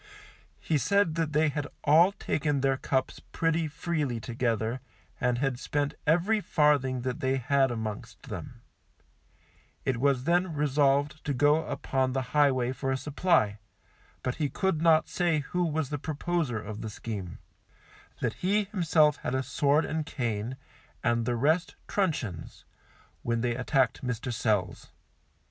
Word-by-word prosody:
He 155 -3 0
said 200 0 +2
that 160 -1 -1
they 155 +1 +3
had 145 0 -3 0.2
all 165 +6 +6
taken 150 -7 -1
their 135 0 +2
cups 130 0 -1
pretty 165 0 +1
freely 150 -5 -2
together, 115 0 -2 0.4
and 125 -1 +1
had 135 -1 -1
spent 145 +1 -1
every 180 +7 +3
farthing 145 -7 +2
that 125 0 -3
they 130 0 +1
had 135 +1 +2
amongst 110 -3 -5
them; - - -8 1.2
it 130 - +1
was 135 0 +2
then 175 +1 +1
resolved 145 0 +1
to 145 - -1
go 145 +4 +3
upon 130 -1 -1
the 130 0 0
highway 130 -4 +3
for 135 0 -2
a 130 - 0
supply, 140 - +1 0.6
but 125 - -2
he 145 - +1
could 190 -3 0
not 165 -1 +4
say 170 -4 +1
who 180 +6 -2
was 160 -4 -1
the 145 - -2
proposer 155 -3 -2
of 105 0 -7
the 110 - -4
scheme; 100 -5 -6 0.8
that - - 0
he 205 +3 +2
himself 165 -7 +2
had 125 - -3
a 130 - 0
sword 140 +4 +2
and 160 -1 -3
cane, 115 0 -3 0.5
and 120 -1 +1
the 120 - +1
rest 155 +8 +1
truncheons, 135 - -2 0.6
when 115 -1 -1
they 120 -1 0
attacked 130 0 +1
Mr. 125 0 -3
Sells. 105 -5 -1
140 Hz, 150 wpm, -28 LUFS, 125-160 Hz, 1.2 s, all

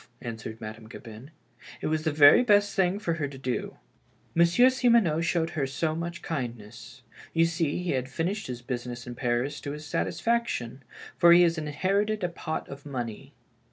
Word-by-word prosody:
" - - -37
answered 110 -1 -7
Madame 110 +1 -9
Gabin; 115 +2 -11 0.5
"it - - -6
was 155 0 0
the 160 - +2
very 145 +9 +7
best 205 -3 +3
thing 190 0 +2
for 190 -5 -2
her 155 -3 -2
to 135 -1 -10
do. 130 -2 -4 0.6
Mon 170 +1 +5
sieur 245 +9 +5
Simoneau 235 -11 +3
showed 165 0 0
her 145 -5 -1
so 155 +4 -1
much 170 +2 -5
kindness. 120 -3 -6 0.3
You 165 0 +5
see, 165 0 -1
he 180 - -1
had 130 0 -2
finished 185 +9 -2
his 125 -1 -6
business 120 -1 -5
in 120 - -6
Paris 125 +4 -1
to 145 - -5
his 150 +1 -8
satisfaction, 160 - -1 0.4
for 170 0 +8
he 175 +1 +7
has 165 -1 +2
inherited 195 +8 -1
a 180 - +1
pot 160 -2 -5
of 140 +1 -10
money. 135 0 -6
150 Hz, 185 wpm, -27 LUFS, 125-175 Hz, 0.6 s, for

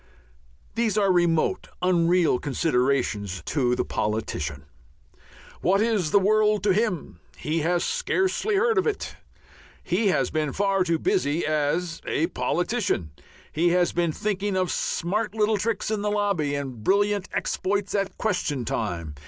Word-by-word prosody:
These 225 -2 0
are 200 -2 +3
remote, 170 -3 +1
unreal 175 -5 +3
considerations 125 - 0
to 125 -5 +1
the - - -1
politician. 75 -10 -3 1.0
What 195 +2 +3
is 215 -7 +1
the 200 - +4
world 210 +1 +3
to 200 -2 +3
him? 210 -5 -1 0.2
He 155 +2 -1
has 170 +2 +1
scarcely 430 -3 0
heard 445 +1 +3
of 380 - 0
it. 430 - -3 0.7
He 195 +5 +1
has 190 - +1
been 155 -3 -1
far 195 -1 +1
too 170 -2 +1
busy 150 +1 0
as 155 +3 -1
a 160 - +1
politician. 175 - -1 0.4
He 170 +3 +2
has 180 -1 +2
been 170 -2 +1
thinking 200 +2 -2
of 185 -1 0
smart 210 +5 -1
little 215 0 +2
tricks 225 0 -2
in 215 -2 -1
the 210 - 0
lobby 200 -9 0
and 130 -6 -5
brilliant 205 - +1
exploits 200 +1 -1
at 195 -1 -1
question 150 - -1
time. 85 -10 -3
180 Hz, 145 wpm, -25 LUFS, 150-205 Hz, 1.0 s, the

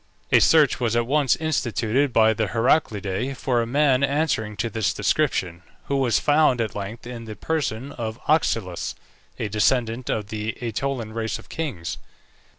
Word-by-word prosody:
A - - +7
search 150 -6 +4
was 120 -2 0
at 120 0 +2
once 140 0 +2
instituted 135 -4 0
by 110 -1 +4
the 110 -1 -1
Heraclidae 115 -1 0
for 125 -3 +1
a 115 - -2
man 140 0 +3
answering 140 -7 0
to 115 - -1
this 110 -1 -1
description, 90 - 0 0.2
who 140 - -1
was 125 -5 +2
found 145 -4 +3
at 110 -2 -1
length 105 +4 -6
in 120 -1 -7
the 110 -1 -7
person 140 -4 -2
of 115 0 -5
Oxylus, 115 - 0 0.4
a - - -2
descendant 115 +3 0
of 105 -2 -2
the 110 0 -3
AEtolian 120 -1 -3
race 115 0 -2
of - - -16
kings. 125 - -4
120 Hz, 160 wpm, -23 LUFS, 110-140 Hz, 0.4 s, A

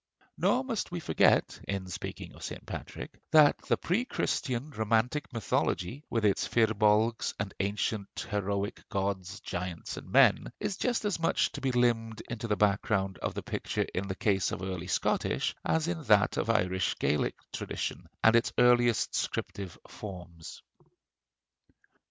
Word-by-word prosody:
Nor 255 +1 +2
must 240 -5 -2
we 175 - -3
forget, - - +3
in 100 -1 -2
speaking 90 - -6
of - - -14
St. - - -6
Patrick, - - -7
that 150 -2 +7
the - - +3
pre 195 +8 0
Christian 135 - -2
romantic 115 +5 0
mythology, 115 +1 -1
with 115 -3 0
its 100 - +2
Firbolgs 110 0 +2
and 100 -2 -3
ancient 100 +1 -2
heroic 100 0 -1
gods, 95 +1 -2
giants, 85 -2 -5
and - - -9
men, - - +5
is 210 -2 -2
just 240 +1 0
as 205 -5 0
much 165 - +2
to 145 - -7
be 135 -1 +1
limned 115 -3 +1
into 115 -1 -3
the 105 - +1
background 100 -1 +1
of - - -3
the - - -4
picture - - -2
in 95 +2 -2
the 95 - -3
case 100 -3 +1
of 95 - -4
early 90 -2 -4
Scottish - - 0
as 160 0 +1
in 170 -1 -2
that 105 -2 +4
of - - -1
Irish 95 -4 +1
Gaelic 75 - +1 0.2
tradition - - -4 0.2
and 110 +1 +7
its 115 - +3
earliest 120 -2 +4
scriptive 95 -4 -3
forms. 90 -5 -9
110 Hz, 150 wpm, -30 LUFS, 95-125 Hz, 0.2 s, that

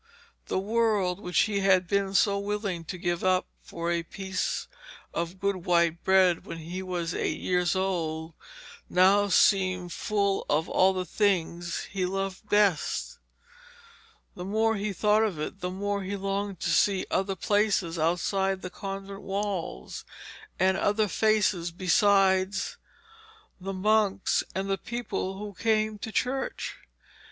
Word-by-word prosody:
The - - -1
world, 205 -3 +1
which 180 -4 +1
he 205 -2 +1
had 190 -2 +3
been 195 +1 0
so 200 0 +3
willing 200 -4 -3
to 180 - -5
give 175 -1 -2
up 185 0 +2 0.2
for 170 0 -4
a 170 0 +1
piece 190 +3 -3 0.5
of 170 +2 -3
good 200 0 0
white 170 -1 +2
bread 185 -3 +4
when 165 - -7
he 170 +3 -6
was 180 -2 -3
eight - - -2
years 180 0 +1
old, 165 -4 -2 0.6
now 195 +3 +5
seemed 185 -2 +3
full 200 -2 0
of 155 +2 +1
all 190 +1 +3
the 185 -1 -2
things 175 -3 0
he 185 -2 -1
loved 195 +2 -4
best. 205 -6 +1 1.1
The 180 - -7
more 220 +4 +1
he 210 0 -2
thought 210 +2 +3
of 205 -8 0
it, 155 +5 -5
the 180 - -3
more 200 +2 -2
he 195 +1 -4
longed 195 -1 -3
to - - 0
see 195 -2 +3
other 195 0 0
places 200 -4 +1
outside 190 +4 0
the 180 - -5
convent 195 +1 -6
walls, 195 - -4 0.5
and 190 +1 +3
other 210 +1 +2
faces 205 -3 +2
besides 190 +1 +2 0.8
the 195 +1 -5
monks 200 0 +2
and 190 +1 -2
the 195 0 -1
people 215 -5 -4
who 205 0 -6
came 215 +1 0
to 220 - -5
church. 265 +4 -2
195 Hz, 145 wpm, -27 LUFS, 180-205 Hz, 1.1 s, now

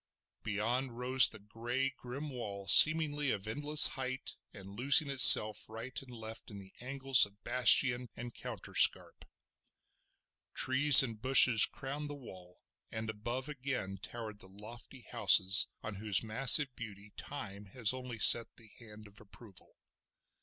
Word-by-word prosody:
Beyond 115 +4 -7
rose 130 +1 +2
the 110 - -15
grey, 120 +6 -8
grim 135 +4 -12
wall 100 -6 -11
seemingly 150 -3 +3
of 100 -2 -7
endless 145 +6 +2
height, 130 0 -10 0.2
and 100 -1 -16
losing 140 +5 -1
itself 110 -6 +6
right 115 +4 -13
and 135 - -20
left 110 -1 -12
in 105 - -14
the 95 -1 -18
angles 135 -1 +1
of 100 +2 -26
bastion 125 0 0
and 120 0 -13
counterscarp. - - -3 1.3
Trees 140 +2 +5
and 115 -4 -11
bushes 130 -3 +4
crowned 145 +2 -11
the 145 - -11
wall, 95 -9 -19 0.3
and 110 0 -9
above 120 +5 -10
again 130 -9 -9
towered 110 -3 -13
the 95 - -16
lofty 115 +6 -15
houses 95 -3 +1 0.2
on 105 -2 -11
whose 105 0 -3
massive 125 +4 +2
beauty 105 -2 -15
Time 105 -8 -12
has 110 +3 -6
only 125 -2 -12
set 115 +2 +4
the 110 -2 -17
hand 110 -2 -17
of 100 +1 -18
approval. 105 -2 -19
120 Hz, 140 wpm, -28 LUFS, 105-130 Hz, 1.3 s, itself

